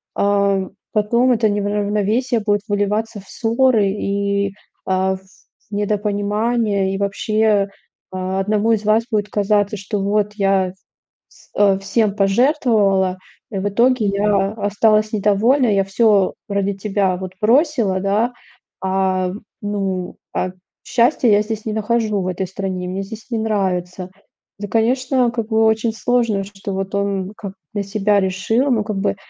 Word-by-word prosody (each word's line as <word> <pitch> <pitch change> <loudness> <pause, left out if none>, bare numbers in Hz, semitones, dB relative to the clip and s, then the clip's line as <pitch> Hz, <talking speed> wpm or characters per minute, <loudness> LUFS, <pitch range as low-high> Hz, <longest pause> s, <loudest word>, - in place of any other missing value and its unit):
ам, 200 -1 +1 0.2
потом 235 +4 +2
это 225 -2 +2
неравновесие 210 +4 0
будет 205 -1 +1
выливаться 210 +1 -1
в 190 - -20
ссоры 230 -2 +2
и, 200 0 -1 0.3
а, 190 0 +1
в 190 - -12 0.5
в - - -14
недопонимания, 205 0 0
и - - -2
вообще, 205 +1 +1 0.4
одному 195 +4 0
из 215 -2 0
вас 215 +2 +3
будет 210 -2 0
казаться, 205 0 +1
что 205 +1 -3
вот 205 +1 +1
я 195 -2 +1 0.6
вс - - -22
э, 200 -2 +4
всем 205 +1 0
пожертвовала, 200 - +2 0.3
и 200 - -3
в 195 - -1
итоге 235 +2 +2
я 200 0 +1
осталась 215 0 +2
недовольна, 215 +6 +3
я 200 -2 +3
всё 195 0 +2
ради 200 0 0
тебя 195 -2 -1
вот 185 0 -6
бросила, 235 - +2
да, 205 +5 +1 0.5
а, 190 -1 0 0.3
ну, 195 -3 -3 0.2
а 185 - -1 0.3
счастья 245 +1 +2
я 205 -1 +5
здесь 215 0 -5
не 215 - -2
нахожу 215 -1 0
в 185 - -3
этой 185 +1 -2
стране, 185 -1 -4
мне 190 +2 -3
здесь 220 +4 -10
не 230 - 0
нравится. 185 -4 -2 0.5
Ну, 205 0 -5
конечно 250 +2 +1
как 230 -2 -4
бы, 220 0 +3
очень 220 +1 +2
сложно, 230 -3 0
что 200 0 -7
вот 195 +1 -3
он, 200 -1 -2
как 200 - -6
бы - - -24 0.2
для 205 -1 -1
себя 205 +1 +1
решил, 210 +8 0
ну, 220 -3 +2
как 210 -2 -3
бы. 200 - 0
205 Hz, 145 wpm, -19 LUFS, 195-220 Hz, 0.6 s, я